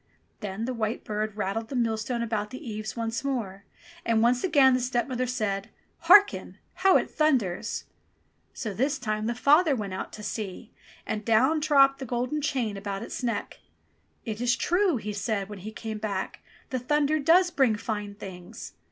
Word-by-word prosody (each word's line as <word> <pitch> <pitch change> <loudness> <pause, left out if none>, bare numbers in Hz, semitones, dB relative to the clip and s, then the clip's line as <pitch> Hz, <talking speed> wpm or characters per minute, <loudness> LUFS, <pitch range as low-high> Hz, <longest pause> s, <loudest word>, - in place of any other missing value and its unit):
Then 210 +1 -4
the 255 - -2
white 220 -1 -2
bird 215 0 -3
rattled 215 +2 -2
the 275 - -5
millstone 235 0 0
about 215 -2 -2
the 255 +4 -9
eaves 215 -1 -5
once 230 +1 -2
more, 210 -8 -3 0.4
and 225 -1 +2
once 245 +1 +3
again 285 -7 +5
the 255 - +2
stepmother 250 0 -1
said, 215 -4 -2 0.2
" - - -41
Harken! 410 0 +6 0.2
How 385 -1 +6
it - - -1
thunders 235 - 0 0.4
!" - - -41 0.3
So 220 -5 -4
this 275 +8 0
time 215 -4 -2
the 235 - -1
father 295 +4 +4
went 205 -5 -4
out 190 - -5
to 210 - -8
see, 210 +1 -5 0.3
and 215 0 -3
down 255 +8 +3
dropped 275 -3 +4
the 265 - -6
golden 250 +6 -1
chain 245 -8 -1
about 200 +1 -4
his 245 - -6
neck. 230 -4 -3 0.7
"It 220 -1 -4
is 245 +1 +3
true," 355 -2 +2
he 210 -1 -5
said 200 -1 -2
when 205 -2 -8
he 210 +4 -7
came 220 -1 -6
back. 200 -3 -3 0.3
''The 255 - -1
thunder 295 +4 +1
does 350 +5 +4
bring 260 -8 +3
fine 210 -2 -4
things 195 +1 -9
230 Hz, 180 wpm, -27 LUFS, 210-265 Hz, 0.7 s, Harken